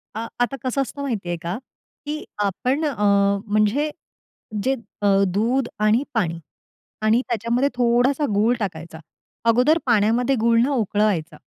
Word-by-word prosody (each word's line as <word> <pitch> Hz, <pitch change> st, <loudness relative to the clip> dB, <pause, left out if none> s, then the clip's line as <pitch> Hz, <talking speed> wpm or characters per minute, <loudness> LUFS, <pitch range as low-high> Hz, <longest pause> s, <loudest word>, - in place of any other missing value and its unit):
अ 230 Hz, +1 st, -4 dB
आता 245 Hz, +3 st, +1 dB
कसं 265 Hz, +2 st, 0 dB
असतं 280 Hz, +1 st, -5 dB
माहितीये 205 Hz, -11 st, -2 dB
का? 175 Hz, +3 st, -3 dB, 0.5 s
की 300 Hz, +1 st, -4 dB, 0.2 s
आपण 250 Hz, -, -1 dB
अ, 290 Hz, -4 st, -1 dB, 0.5 s
म्हणजे 215 Hz, +9 st, +2 dB, 0.7 s
जे 265 Hz, +1 st, +1 dB, 0.3 s
अ, -, -, +2 dB, 0.2 s
दूध 230 Hz, +7 st, 0 dB
आणि 215 Hz, +5 st, +3 dB
पाणी. 170 Hz, -7 st, 0 dB, 0.6 s
आणि 220 Hz, +2 st, +3 dB
त्याच्यामध्ये 235 Hz, +4 st, +1 dB
थोडासा 245 Hz, +4 st, +2 dB
गूळ 220 Hz, +4 st, +3 dB
टाकायचा. 165 Hz, -5 st, -5 dB, 0.5 s
अगोदर 250 Hz, +8 st, +4 dB
पाण्यामध्ये 235 Hz, +3 st, +2 dB
गूळ 230 Hz, 0 st, +3 dB
ना 270 Hz, -, +1 dB
उकळवायचा. 205 Hz, -, 0 dB
230 Hz, 130 wpm, -22 LUFS, 205-260 Hz, 0.7 s, अगोदर